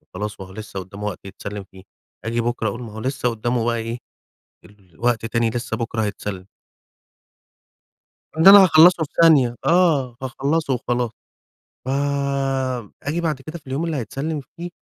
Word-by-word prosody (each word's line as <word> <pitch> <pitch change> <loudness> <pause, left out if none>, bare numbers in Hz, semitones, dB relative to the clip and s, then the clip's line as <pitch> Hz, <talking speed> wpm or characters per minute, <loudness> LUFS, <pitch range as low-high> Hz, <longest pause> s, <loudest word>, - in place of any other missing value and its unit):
وخلاص، 105 +2 -5
وهو 95 -1 -9
لسه 105 -2 -7
قُدّامه 100 +3 -8
وقت 105 -4 -4
يتسلّم 100 +1 -7
فيه. 95 -1 -14 0.4
آجي 115 +1 0
بُكرة 120 -1 -1
أقول 115 +5 -6
ما 115 - -9
هو 110 - -7
لسه 130 +1 -1
قُدّامه 120 +1 -1
بقي 120 0 +1
إيه، 115 +1 -4 0.7
الوقت 105 +4 -3
تاني 115 0 +1
لسه 115 -1 -3
بُكرة 110 -1 -2
هيتسلّم. 100 -2 -4 1.9
إن 160 - +5
أنا 200 0 +11
هاخلّصه 165 -1 +6
في 145 - -7
ثانية، 140 -8 +5
آه، 155 -9 +3
هاخلّصه 140 +3 -1
وخلاص. 120 -1 -1 0.8
ف - - -4 1.1
آجي 155 +4 -2
بَعد 155 -5 -1
كده 155 +4 -7
في 150 - -27
اليوم 135 +5 -2
اللي 160 -3 -2
هيتسلّم 140 +5 -3 0.2
فيه 175 +1 -6
120 Hz, 155 wpm, -22 LUFS, 110-150 Hz, 1.9 s, أنا